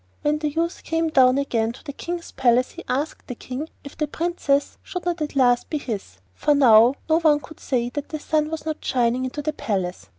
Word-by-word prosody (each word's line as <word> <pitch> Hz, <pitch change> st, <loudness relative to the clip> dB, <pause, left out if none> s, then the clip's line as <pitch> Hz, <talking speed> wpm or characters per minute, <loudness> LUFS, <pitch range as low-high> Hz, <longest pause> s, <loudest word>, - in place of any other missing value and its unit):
When 300 Hz, +1 st, +1 dB
the 300 Hz, -1 st, 0 dB
youth 335 Hz, +4 st, -2 dB
came 325 Hz, 0 st, 0 dB
down 260 Hz, -3 st, +5 dB
again 230 Hz, -5 st, 0 dB
to -, -, -15 dB
the 285 Hz, -, -7 dB
King's 340 Hz, +3 st, -5 dB
palace 250 Hz, -1 st, +2 dB
he -, -, -10 dB
asked 280 Hz, +5 st, -2 dB
the 250 Hz, -, -5 dB
King 260 Hz, +7 st, -6 dB
if 280 Hz, -, -10 dB
the 300 Hz, -, -1 dB
Princess 295 Hz, -3 st, -1 dB
should 360 Hz, -1 st, -6 dB
not 350 Hz, -2 st, -1 dB
at 300 Hz, -1 st, -3 dB
last 245 Hz, -3 st, +3 dB
be 305 Hz, -, -1 dB
his, 205 Hz, -, -5 dB, 0.2 s
for 290 Hz, -, +2 dB
now 240 Hz, -2 st, +6 dB
no 320 Hz, +1 st, +4 dB
one 305 Hz, -3 st, +4 dB
could 295 Hz, +3 st, -13 dB
say 240 Hz, -3 st, -1 dB
that 290 Hz, +3 st, -5 dB
the 310 Hz, -, -3 dB
sun 305 Hz, 0 st, 0 dB
was 320 Hz, -1 st, -5 dB
not 315 Hz, -1 st, -4 dB
shining 250 Hz, 0 st, +1 dB
into 290 Hz, +3 st, -4 dB
the 310 Hz, +1 st, -1 dB
palace. 190 Hz, -9 st, -3 dB
285 Hz, 225 wpm, -23 LUFS, 250-310 Hz, 0.2 s, now